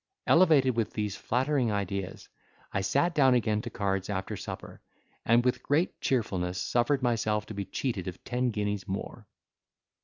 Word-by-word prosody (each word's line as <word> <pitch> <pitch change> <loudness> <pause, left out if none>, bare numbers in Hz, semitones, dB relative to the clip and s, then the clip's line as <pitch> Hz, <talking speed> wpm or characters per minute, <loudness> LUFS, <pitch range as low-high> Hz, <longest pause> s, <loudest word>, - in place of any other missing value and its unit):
Elevated 150 -8 +5
with 115 -2 -1
these 105 -2 -2
flattering 130 -1 0
ideas, 100 -2 -3 0.5
I 95 - +1
sat 140 - +1
down 135 -4 +5
again 110 -3 +1
to - - -6
cards 95 -1 -2
after 95 -2 -3
supper, - - -8 0.5
and 120 +2 +4
with 125 - +1
great 155 +6 0
cheerfulness 95 -8 0
suffered 125 +3 +1
myself 110 -3 +1
to 110 - -8
be 100 -1 -4
cheated 105 -8 -3
of 90 0 -7
ten 125 0 0
guineas 105 -3 -2
more. 95 - -5
110 Hz, 155 wpm, -29 LUFS, 100-130 Hz, 0.5 s, Elevated